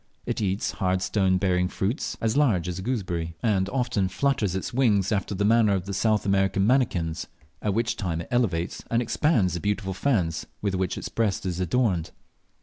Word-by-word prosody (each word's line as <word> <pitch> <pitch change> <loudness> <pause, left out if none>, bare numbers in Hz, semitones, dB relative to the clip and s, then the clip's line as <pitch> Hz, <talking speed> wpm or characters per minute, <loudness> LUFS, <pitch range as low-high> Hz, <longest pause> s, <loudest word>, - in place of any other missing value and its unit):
It - - -2
eats 100 0 0
hard 95 -2 0
stone 95 0 +2
bearing 90 -1 +1
fruits 100 - -2
as 110 +1 0
large 110 - +2
as 90 +1 -3
a - - -4
gooseberry, 90 -8 -2
and 100 -4 +2
often 125 -6 0
flutters 110 -4 0
its 95 - -3
wings 110 -7 +2
after 100 -1 -1
the 100 +2 0
manner 110 -2 +4
of 95 -2 -3
the 100 - -4
South 105 +2 +1
American 95 0 +2
manakins, 95 -10 +1 0.3
at 105 -2 0
which 115 0 0
time 85 -5 -2
it - - -9
elevates 95 -9 0
and 115 - +2
expands 120 - +1
the 85 - -2
beautiful 100 0 -1
fans 95 - 0
with 100 -2 -1
which 95 -1 -1
its - - -4
breast 105 -5 -1
is 90 -1 -2
adorned. 90 -2 +1
100 Hz, 190 wpm, -26 LUFS, 90-115 Hz, 0.3 s, manner